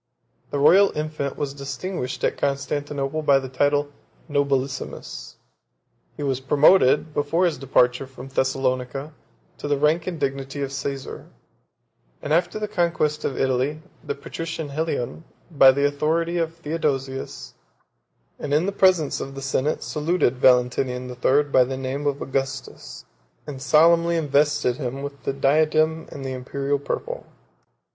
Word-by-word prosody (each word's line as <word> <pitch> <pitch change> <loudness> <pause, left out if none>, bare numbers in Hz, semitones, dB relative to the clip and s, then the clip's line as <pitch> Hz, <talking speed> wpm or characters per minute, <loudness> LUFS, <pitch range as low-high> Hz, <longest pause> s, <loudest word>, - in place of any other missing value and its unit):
The - - -2
royal 190 +8 +6
infant 150 -2 -3
was 145 -2 -3
distinguished 140 0 -5
at - - +1
Constantinople 145 +1 -2
by 140 -2 +4
the 135 -1 -3
title 145 +3 +2
of 145 0 -13 0.4
Nobilissimus: 135 - -2 0.8
he 145 - -4
was 135 -2 0
promoted, 150 +2 +4
before 155 +5 +1
his 165 -7 0
departure 125 -1 +2
from 130 0 -11
Thessalonica, 135 +1 -1 0.5
to - - -4
the 145 -1 +1
rank 155 +4 +2
and 175 -3 -4
dignity 135 0 -3
of 135 0 -4
Caesar; 135 0 -5 0.9
and 150 - -2
after 175 +4 +1
the 210 0 -3
conquest 170 -6 0
of 135 - -2
Italy, 135 +4 0 0.2
the - - -3
patrician 165 -2 -6
Helion, 155 -1 -3 0.3
by 135 -4 +7
the 140 +2 +1
authority 165 +4 0
of 165 0 -2
Theodosius, 135 - -3 0.9
and 145 0 -1
in 155 +4 +2
the 200 - 0
presence 185 -6 +3
of 135 0 -6
the 135 - -6
senate, 140 +2 -1
saluted 150 -4 0
Valentinian 125 0 +2
the 125 - -7
Third 140 +4 +2
by 130 - +6
the 130 +1 -4
name 135 +2 -3
of 140 0 -1
Augustus, 135 0 -4 0.4
and 135 -3 -7
solemnly 170 +3 +4
invested 145 -4 +2
him 135 0 -4
with 140 0 -8
the 140 - 0
diadem 155 +3 +2
and 135 - -7
the 135 - -3
Imperial 140 +2 -2
purple. 485 - -4
140 Hz, 145 wpm, -23 LUFS, 135-155 Hz, 0.9 s, by